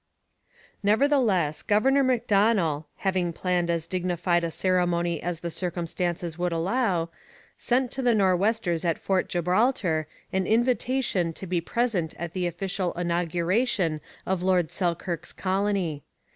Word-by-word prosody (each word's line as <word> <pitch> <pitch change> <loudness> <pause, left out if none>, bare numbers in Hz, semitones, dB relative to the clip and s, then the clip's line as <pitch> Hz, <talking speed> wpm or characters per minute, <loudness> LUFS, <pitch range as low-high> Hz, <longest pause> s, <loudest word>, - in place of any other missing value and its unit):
Nevertheless, 210 - +2
Governor 265 +7 +3
Macdonell, 205 - +2
having 185 -3 0
planned 175 0 -1
as 165 -1 0
dignified 175 -1 0
a 170 - 0
ceremony 175 -1 0
as 170 -1 -3
the 170 - -4
circumstances 175 -1 -3
would 180 0 0
allow, 175 -1 0 0.4
sent 250 0 0
to 265 - -3
the 240 -3 +3
Nor'westers 190 -2 +1
at 165 -2 +1
Fort 190 -1 0
Gibraltar 180 - +1 0.3
an 190 -1 0
invitation 240 -6 +1
to 190 - -8
be 175 -1 -1
present 195 -5 -1
at 170 0 -5
the 180 -2 -1
official 185 +1 -2
inauguration 175 +1 0 0.2
of 190 -1 -1
Lord 180 -3 +2
Selkirk's 175 -2 -2
colony. 190 -5 -1
180 Hz, 125 wpm, -26 LUFS, 170-205 Hz, 0.4 s, Governor